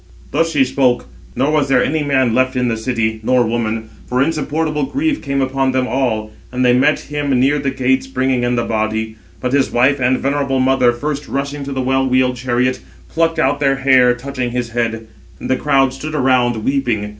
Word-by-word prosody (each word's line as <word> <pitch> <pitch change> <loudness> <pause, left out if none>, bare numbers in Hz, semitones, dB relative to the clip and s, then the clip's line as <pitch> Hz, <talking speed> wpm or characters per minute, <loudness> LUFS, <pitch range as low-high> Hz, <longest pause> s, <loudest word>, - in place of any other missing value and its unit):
Thus 165 0 +1
she 145 -4 +3
spoke; 125 -2 +1 0.3
nor 140 +3 +1
was 150 -3 +1
there 125 -2 +4
any 155 +1 0
man 135 -5 +1
left 130 +1 +1
in 125 -1 +1
the 115 - 0
city, 110 -1 -2
nor 125 +2 +2
woman; 115 -1 -2 0.2
for 125 - -1
insupportable 155 -1 -1
grief 300 +1 -1
came 140 -1 -1
upon 135 0 0
them 130 0 +1
all, 115 -5 -1 0.2
and 125 0 0
they 125 - +5
met 130 +5 +2
him 145 -1 -4
near 140 +3 +2
the 140 -1 -1
gates 130 0 0
bringing 130 -1 0
in 120 0 +1
the 120 - 0
body. 110 0 -2 0.2
But 125 0 -2
his 140 -1 +2
wife 130 +4 +2
and 130 0 +2
venerable 140 -1 -1
mother 130 -1 +3
first 145 +4 -4
rushing 140 +1 -3
to 140 - -5
the 130 -1 -2
well 135 +1 +1
wheeled 130 0 +2
chariot, 125 +1 0 0.3
plucked 165 0 0
out 145 -2 +1
their 135 -1 +2
hair, 130 -2 +4
touching 130 0 -4
his 120 -1 -3
head; 115 -1 -2 0.3
and - - -4
the - - +4
crowd 135 -2 +2
stood 155 +3 -6
around, 125 -5 +1
weeping. 120 -7 0
130 Hz, 200 wpm, -17 LUFS, 125-140 Hz, 0.3 s, they